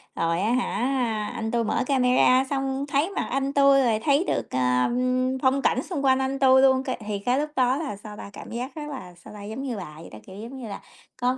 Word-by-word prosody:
Rồi 165 +2 0
á 220 +3 +1
hả, 245 -3 0
anh 220 0 -3
tui 235 -1 +1
mở - - 0
camera 255 -1 +4
xong 270 0 -2
thấy 285 +6 +1
mặt - - -2
anh 275 +1 -1
tui 275 -1 +5
rồi 225 -3 +2
thấy 285 +7 +2
được, - - -1
ơ, 125 - +2 0.5
phong 270 +1 +2
cảnh 260 - +1
xung 285 -7 -4
quanh 260 0 +4
anh 265 +1 -2
tui 265 -1 +6
luôn 265 -1 +4
cái 260 - -3
thì 205 -1 -2
cái 245 +6 +1
lúc 300 +1 -2
đó 255 +1 +2
là, 295 -9 -4
sao 210 0 -10
ta, - - -8
cảm - - -10
giác 250 +3 -5
rất 300 -1 -6
là, 185 -11 -8
sao 170 - -14
ta, 205 -1 -10
giống 220 +5 -6
như 245 -6 -3
bà 165 -5 -7
vậy 165 - -11
đó, 110 - -10
kiểu, 190 - -11
giống 235 +5 -8
như 230 - -6
là 200 - -7 0.4
có 250 +1 +1
255 Hz, 250 wpm, -25 LUFS, 215-275 Hz, 0.5 s, tui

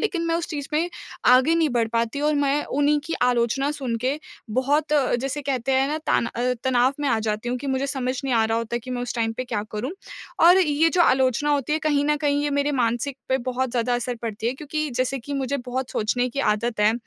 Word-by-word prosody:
लेकिन 380 -6 -1
मैं 330 - +1
उस 335 0 -1
चीज़ 290 -3 -4
में 325 +3 +1 0.4
आगे 260 +6 +5
नहीं 330 -2 +2
बढ़ 230 -2 +1
पाती 230 +4 -1
और 300 +1 +2
मैं 285 0 +1
उन्हीं 295 +1 +3
की 330 - -5
आलोचना 250 +3 +2
सुन 265 -5 -3
के 275 +3 0 0.4
बहुत 295 +3 +1
अ, 275 -5 +2
जैसे 275 +4 -3
कहते 265 -1 -1
हैं 265 +1 +3
ना 305 - -1
ताना 235 - +1
अ, 250 +1 +1
तनाव 255 0 +3
में 285 - 0
आ 230 - +2
जाती 215 +3 -2
हूँ 250 - -1
कि 285 - -7
मुझे 265 0 0
समझ 260 -2 -2
नहीं 260 - 0
आ 225 -1 +3
रहा 225 +1 0
होता 230 +1 -3
कि 255 +2 -10
मैं 245 -1 -2
उस 245 - -4
टाइम 225 -1 0
पे 255 - -3
क्या 230 -4 -2
करूँ। 215 +6 -3 0.6
और 355 +2 +8
ये 320 -2 +3
जो 360 - +1
आलोचना 265 +1 +2
होती 285 0 0
है, 310 - +2
कहीं 295 -2 +1
न 300 0 +2
कहीं 290 0 0
ये 295 - 0
मेरे 285 +1 +1
मानसिक 240 +4 -1
पे 260 0 +2
बहुत 255 0 -1
ज़्यादा 245 0 0
असर 245 +1 -2
पड़ती 220 0 -4
है 240 - +1
क्योंकि 305 +2 -3
जैसे 255 +2 -1
कि 275 +4 -8
मुझे 275 0 -1
बहुत 255 +1 -3
सोचने 245 +4 0
की 275 +3 -3
आदत 230 0 -3
है 210 +1 +5
265 Hz, 245 wpm, -24 LUFS, 240-290 Hz, 0.6 s, और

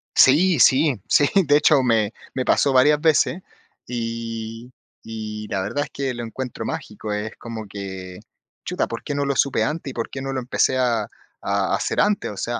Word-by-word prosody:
Sí, 160 +4 +5
sí, 135 - +4
sí. 145 - +5 0.2
De 145 +1 +5
hecho, 150 -2 +4
me 110 -3 +2 0.2
me 130 -1 -1
pasó 140 - +3
varias 145 +3 +5
veces, 165 +3 +2 0.4
y 115 0 -5 0.3
y 105 -1 -6
la 95 -1 -2
verdad 145 +9 -2
es - - -12
que 135 -2 -3
lo 120 0 -5
encuentro 125 +2 -6
mágico. 105 -1 -5
Es 105 +2 -3
como 115 -2 -7
que: 95 -2 -7 0.5
"Chuta, - - -1
¿por 115 - -6
qué 145 - -3
no 145 0 0
lo 140 -1 -1
supe 140 -2 +2
antes 150 -2 -3
y - - -9
por 115 - -4
qué 135 - -6
no 135 0 -3
lo 130 - -2
empecé 130 +1 +1
a 120 -4 +1
a - - -12 0.3
a 100 -1 0
hacer - - -1
antes? 205 - +1
O 100 - -8
sea, 120 +4 -2
120 Hz, 200 wpm, -22 LUFS, 110-140 Hz, 0.5 s, Sí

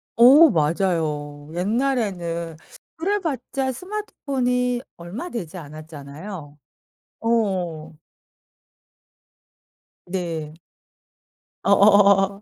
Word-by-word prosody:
어 275 +8 +8
맞아요. 155 - -1
옛날에는 180 - -1 0.4
그래 395 +6 0
봤자 270 - -2
스마트폰이 255 - -2 0.2
얼마 180 - -7
되지 185 - -6
않았잖아요. 155 +1 -9 0.6
어. 185 -9 -1 2.1
네. 165 -4 -4 1.1
어어어어어. 200 0 +5
195 Hz, 160 characters per minute, -23 LUFS, 160-250 Hz, 2.1 s, 어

